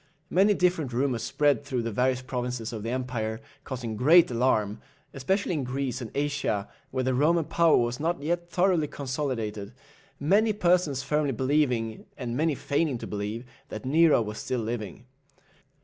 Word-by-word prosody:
Many 200 +3 +4
different 175 -9 +1
rumours 125 -2 0
spread 145 +3 +1
through 130 -4 -2
the 115 - -2
various 125 +3 +1
provinces 125 -2 -4
of 110 - -5
the 115 - -4
empire, 120 -3 -3 0.2
causing 120 -5 -5
great 160 +7 +6
alarm, 115 -4 +1 0.3
especially 185 +8 0
in 150 -4 -1
Greece 130 0 -3
and 115 - -5
Asia, 140 -8 -1 0.2
where 130 0 -2
the 130 0 +1
Roman 160 +5 +3
power 170 0 +4
was 120 0 0
not 170 +3 -1
yet 175 +2 -2
thoroughly 175 -3 +2
consolidated, 125 -7 -4 0.5
many 205 +9 +3
persons 175 -8 +2
firmly 150 -1 0
believing, 125 -4 0
and 120 -2 -4
many 155 +2 +1
feigning 140 0 0
to - - -7
believe, 105 +4 -4 0.2
that 110 - -7
Nero 155 -2 +4
was 105 0 -6
still 125 -2 -2
living. 110 0 -5
130 Hz, 160 wpm, -27 LUFS, 120-155 Hz, 0.5 s, great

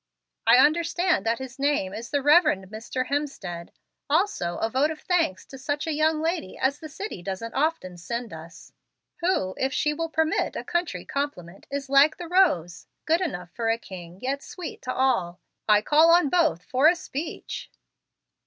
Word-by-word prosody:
I - - +8
understand 335 +3 +3
that 230 +1 +2
his 260 0 -9
name 280 -10 +1
is 230 +1 -6
the 285 -2 0
Rev. 310 +4 +6 0.3
Mr. 230 +4 -3
Hemstead. 260 - -4 0.4
Also 300 - +1
a - - 0
vote 265 +6 +1
of 315 -1 -6
thanks 330 - 0
to 270 - -11
such 290 +2 -2
a 320 - -1
young 310 +1 +2
lady 330 - -2
as 275 +2 0
the 315 - -9
city 325 - -6
doesn't 195 +5 -5
often 280 - -1
send 235 +6 -5
us, 160 +2 -12 0.4
who, 335 - 0
if 265 +1 +1
she 300 +2 +1
will 330 +2 -3
permit 320 0 0
a - - -4
country 345 -1 -2
compliment, 195 -11 -5
is 280 -1 -4
like 280 +3 +5
the 350 - -7
rose, 240 - +2 0.2
good 330 +3 +2
enough 180 - -4
for 230 -1 -2
a 225 - +2
king, 180 -5 -10
yet 275 +2 -1
sweet 355 0 -8
to 255 - -3
all. 235 -11 0 0.3
I 210 0 +5
call 310 +5 +5
on 340 -3 +5
both 320 - +2
for 260 +8 +3
a 345 - +5
speech." 320 -1 -6
280 Hz, 180 wpm, -25 LUFS, 215-320 Hz, 0.4 s, I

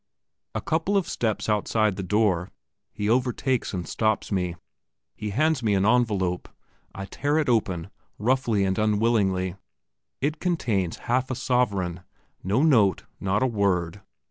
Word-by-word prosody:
A - - -1
couple 165 +6 0
of 195 - 0
steps 110 -3 -1
outside 105 -1 +1
the 95 - -4
door 95 -2 +1 0.4
he 105 0 -3
overtakes 125 +1 +1
and 90 -3 -4
stops 110 -1 0
me. 90 -3 -1 0.6
He 105 - -4
hands 155 +6 +1
me 105 -3 +2
an 95 0 +2
envelope. 105 -7 +1 0.5
I 95 - -5
tear 145 +8 -1
it 155 - +1
open, 100 -6 0 0.3
roughly 115 -2 +1
and 95 +1 0
unwillingly. 105 -4 +1 0.6
It 150 +3 -1
contains 110 - 0
half 130 +2 +1
a 130 - -2
sovereign 100 -9 0 0.4
no 105 +9 +2
note, 110 - +4 0.2
not 100 +4 0
a - - +4
word. 100 -5 0
105 Hz, 145 wpm, -25 LUFS, 95-125 Hz, 0.6 s, note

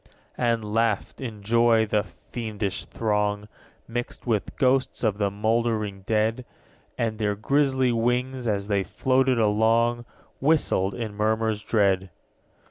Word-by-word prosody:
15. - - -29 0.3
And 110 -3 -1
laughed, 115 0 0
in 110 -5 -6
joy, 115 +1 +4
the 105 -1 +1
fiendish 105 -5 -5
throng, 105 -1 -1 0.4
Mixed 120 +1 -5
with 110 -5 -1
ghosts 130 -1 +1
of 105 -3 +1
the 100 -1 +2
mouldering 110 -1 -1
dead: 110 +3 +1 0.5
And 115 -2 -1
their 105 -1 0
grisly 130 +3 +2
wings, 125 +2 0
as 100 -2 -1
they 100 -2 +1
floated 130 +7 +1
along, 115 +2 +2 0.3
Whistled 130 -10 +2
in 110 0 -4
murmurs 110 0 0
dread. 95 -3 +1
110 Hz, 130 wpm, -25 LUFS, 105-120 Hz, 0.5 s, joy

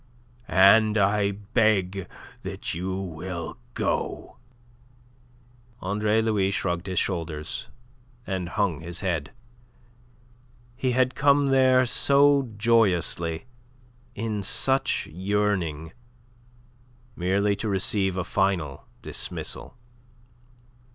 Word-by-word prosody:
and 105 +3 +5
I 100 0 +2
beg 100 -2 0 0.3
that - - -5
you 95 +3 -3
will 90 -2 -6 0.2
go." - - -2 1.4
Andre 105 +3 0
Louis 105 -4 +1
shrugged 90 -2 -2
his 95 -1 -4
shoulders 80 -9 -2 0.6
and 95 -3 -3
hung 90 -7 -1
his 85 +1 -6
head. 85 -7 -2 1.5
He 130 -1 -1
had 130 +1 +2
come 140 0 +3
there 130 -1 +4
so 140 +1 +4
joyously, 95 -7 +1 0.7
in 105 -1 -3
such 130 +7 +2
yearning, 90 -4 -2 1.2
merely 100 +3 +1
to 110 - -3
receive 95 -1 0
a 95 - 0
final 95 -7 -1 0.2
dismissal. - - -4
100 Hz, 90 wpm, -25 LUFS, 90-110 Hz, 1.5 s, and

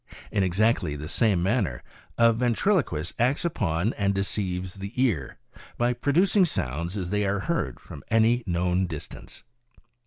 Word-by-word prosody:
In 105 - +1
exactly 95 -4 +1
the 75 +1 -6
same 100 -1 +2
manner 95 - 0 0.3
a 115 0 +5
ventriloquist 120 - 0
acts 130 +8 +1
upon 105 - 0
and 100 -1 0
deceives 95 -2 -2
the 100 0 -7
ear, 110 - 0 0.4
by 120 +1 +2
producing 180 - +3
sounds 85 - -2
as 90 -2 -4
they 105 0 +1
are 100 0 0
heard 170 +7 -2
from 75 -6 -11
any 115 +2 +3
known 90 +1 +1
distance." 80 -4 -9
100 Hz, 145 wpm, -26 LUFS, 90-120 Hz, 0.4 s, a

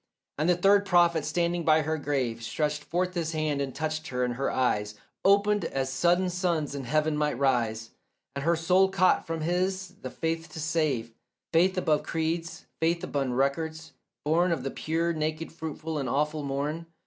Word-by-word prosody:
And 155 +3 +2
the 180 - +5
third 195 +3 +4
prophet 175 -4 +3
standing 170 +2 0
by 155 0 +4
her 160 +1 -1
grave 130 -6 -1
Stretched 150 +5 -2
forth 180 +3 -1
his 165 -2 -2
hand 155 -2 0
and 135 -2 -4
touched 155 0 -3
her, 125 -1 -1
and 125 -1 0
her 135 +3 -1
eyes 105 -5 0 0.3
Opened 205 +1 +4
as 135 -1 -2
sudden 175 +6 +2
suns 175 -5 -1
in 140 -2 -5
heaven 155 +3 +1
might 150 -3 0
rise, 115 -5 0 0.4
And 140 - -3
her 170 +2 +3
soul 180 +4 +3
caught 190 -1 +2
from 165 -1 -3
his 185 +3 -1
the - - -5
faith 165 0 -3
to 160 - -6
save; 150 -8 0 0.4
Faith 185 +3 +4
above 155 -4 +2
creeds, 165 +1 -3
faith 165 +1 +1
beyond 135 -3 -1
records, 160 +4 -1 0.3
born 170 +4 +3
Of 160 -6 -1
the 135 - -3
pure, 165 +2 -1
naked, 155 +1 -3
fruitful, 160 -1 -5
awful 150 +3 0
morn. 145 +4 -3
160 Hz, 175 wpm, -28 LUFS, 140-170 Hz, 0.4 s, the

